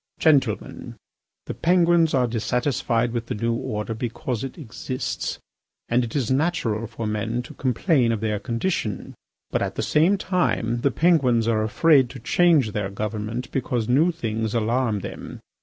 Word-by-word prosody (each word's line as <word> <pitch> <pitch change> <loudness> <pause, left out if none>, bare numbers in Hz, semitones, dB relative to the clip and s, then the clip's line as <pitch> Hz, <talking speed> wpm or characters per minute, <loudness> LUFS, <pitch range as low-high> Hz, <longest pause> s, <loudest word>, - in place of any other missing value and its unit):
"Gentlemen, 135 -9 +1 0.5
the - - -4
Penguins 170 - +3
are 125 -2 +3
dissatisfied 120 +1 0
with 115 -1 -3
the - - -3
new 115 +2 0
order 115 -2 -3
because 120 +1 -4
it 135 +4 -6
exists, 130 -2 -4 0.5
and 120 +1 +2
it 115 - -6
is 130 -4 0
natural 130 -7 0
for 115 0 -6
men 110 +3 -2
to 125 - -11
complain 130 - +1
of 115 - -1
their 105 -1 -1
condition. 115 - -3 0.4
But - - 0
at - - -2
the - - -2
same 170 +7 +3
time 125 -12 0
the 140 - +3
Penguins 130 -7 +3
are 110 -2 +2
afraid 130 +5 +4
to - - -9
change 150 -1 +3
their 100 -1 -2
government 110 +4 -4
because 120 -4 -1
new 150 +8 +3
things 115 -8 -3
alarm 115 -1 0
them. - - -8
120 Hz, 155 wpm, -23 LUFS, 110-140 Hz, 0.5 s, afraid